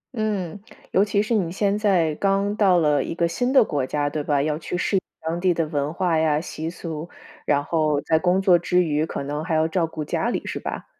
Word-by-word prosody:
嗯， 205 -5 -2 0.3
尤 195 - +4
其 205 0 +1
是 215 - -2
你 185 -7 +1
现 200 +2 0
在 180 -7 +2
刚 195 +4 0
到 195 -4 +4
了 150 -3 +2
一 - - -5
个 170 0 +1
新 245 +10 -1
的 265 -2 +6
国 145 -9 -2
家， 145 +3 -1
对 150 - -2
吧？ 145 -1 +1
要 150 0 -1
去 170 - -4
适 195 - 0
应 - - 0 0.2
当 165 +2 -3
地 180 -2 +2
的 165 - 0
文 145 -1 -2
化 175 -2 0
呀、 155 -2 +2
习 160 0 -5
俗， 165 -1 -6 0.4
然 145 -1 +2
后 155 -1 +1
在 160 - +2
工 180 +2 +2
作 185 -3 +4
之 180 +1 +2
余， 155 -1 0
可 - - -4
能 145 +2 -4
还 165 -1 -1
要 155 +1 +3
照 165 0 0
顾 155 -1 -6
家 - - -1
里， - - -2
是 - - -4
吧？ - - -5
170 Hz, 255 characters per minute, -23 LUFS, 155-190 Hz, 0.4 s, 的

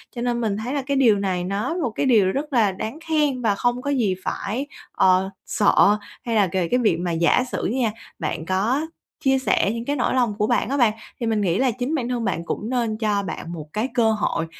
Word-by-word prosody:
Cho 240 - -4
nên 240 0 0
mình 210 -3 -1
thấy 235 +5 -4
là 285 - 0
cái 275 +1 -1
điều 225 -6 +4
này 185 -3 -1
nó 200 - -2
một 320 -9 -1
cái 220 - -1
điều 215 -8 +4
rất 290 +6 -4
là 220 -5 +4
đáng 220 +9 -6
khen 295 -5 +1
và 215 -4 +2
không 245 +4 0
có 285 - -3
gì 225 -9 +1
phải, 240 +8 -3 0.2
ờ, 185 +1 +3 0.2
sợ 205 0 +4 0.3
hay 230 -2 -1
là 205 -3 +4
kề 180 0 -1
cái 250 - +1
việc 215 -9 +2
mà 175 0 -2
giả 170 +9 +3
sử - - -2
nha, 240 -2 0 0.3
bạn 160 0 -3
có 220 - 0 0.4
chia 270 -1 +3
sẻ 235 -6 +2
những 230 0 -5
cái 285 - -1
nỗi 250 - 0
lòng 245 -4 +2
của 210 - +1
bạn 220 - +1
á 280 - 0
bạn, 235 -5 +4 0.3
thì 240 - -2
mình 220 -2 +1
nghĩ 180 -3 +1
là 260 -1 +3
chính 255 +6 -2
bản 250 -5 -2
thân 245 -2 -1
bạn 170 -4 -2
cũng 210 +5 -4
nên 235 -4 -1
cho 210 -2 0
bạn 170 -2 -6
một 155 -3 -7
cái 220 +4 0
cơ 230 -2 +3
hội 210 -6 -1
225 Hz, 245 wpm, -23 LUFS, 200-255 Hz, 0.4 s, điều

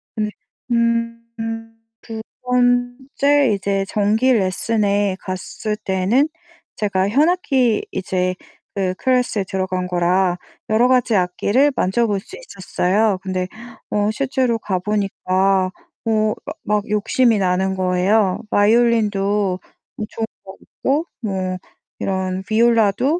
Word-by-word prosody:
네 215 -1 -1 0.4
음. 230 0 0 0.8
2 225 -1 -7 0.2
번째 250 +2 +2
이제 195 0 -1
정기 220 +5 +2
레슨에 200 -1 +1
갔을 200 +3 -4
때는 210 +8 +1 0.5
제가 200 -2 0
현악기 270 - +2
이제 185 -1 -1 0.4
그 190 -2 -1
클래스에 250 -5 +1
들어간 185 -1 -2
거라 180 +1 +1 0.3
여러 230 +3 +4
가지 250 -4 +3
악기를 205 +10 +2
만져 225 +6 +1
볼 200 -2 0
수 385 - -12
있었어요. 200 - 0
근데 185 -1 -2 0.4
어 210 0 +1
실제로 255 -1 0
가 185 -4 -2
보니까 195 -1 +1 0.4
어 215 -1 +1
마 300 - -5
막 210 0 -1
욕심이 220 +2 +2
나는 190 0 +1
거예요. 185 +2 +2
바이올린도 205 -3 +2 0.5
좋은 225 - -3 0.2
거고 270 - -3 0.2
뭐 185 -3 -2 0.4
이런 190 -1 -2
비올라도 230 - +3
210 Hz, 215 characters per minute, -20 LUFS, 190-235 Hz, 0.8 s, 여러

